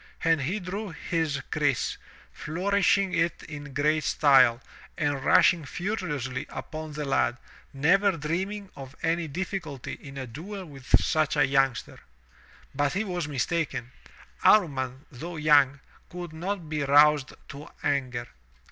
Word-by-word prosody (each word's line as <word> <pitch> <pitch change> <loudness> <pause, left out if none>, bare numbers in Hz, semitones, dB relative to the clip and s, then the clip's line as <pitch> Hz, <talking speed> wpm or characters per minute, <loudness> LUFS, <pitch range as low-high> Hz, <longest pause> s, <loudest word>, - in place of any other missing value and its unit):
And 165 -2 +3
he 180 +10 -1
drew 200 +3 -5
his 160 -3 -2
kriss, 145 -7 0 0.4
flourishing 195 +3 +1
it 165 0 0
in 145 -2 -8
great 150 +3 +1
style, 135 -6 +5 0.4
and 145 -3 0
mshing 160 +2 +4
furiously 150 - -3
upon 155 -1 -7
the 150 0 -4
lad, 135 -2 +1 0.3
never 190 +8 +3
dreaming 190 +6 -3
of 135 0 -10
any 165 0 0
diffi 190 +5 -3
culty 140 -6 -8
in 135 -1 -10
a 135 - -4
duel 185 - -8
with 135 -5 +1
such 155 -1 +1
a 145 - +5
youngster. 135 -2 0 0.7
But 145 0 0
he 195 +4 0
was 180 -6 -3
mistaken. 145 -2 -2 0.5
Amman, 135 -8 +3
though 165 +7 -7
young, 145 -3 +4 0.3
could 175 -2 -7
not 175 +1 -4
be 155 -1 -2
roused 145 0 +4 0.2
to 140 +2 -9
anger. 130 -4 -1
150 Hz, 135 wpm, -27 LUFS, 140-175 Hz, 0.7 s, style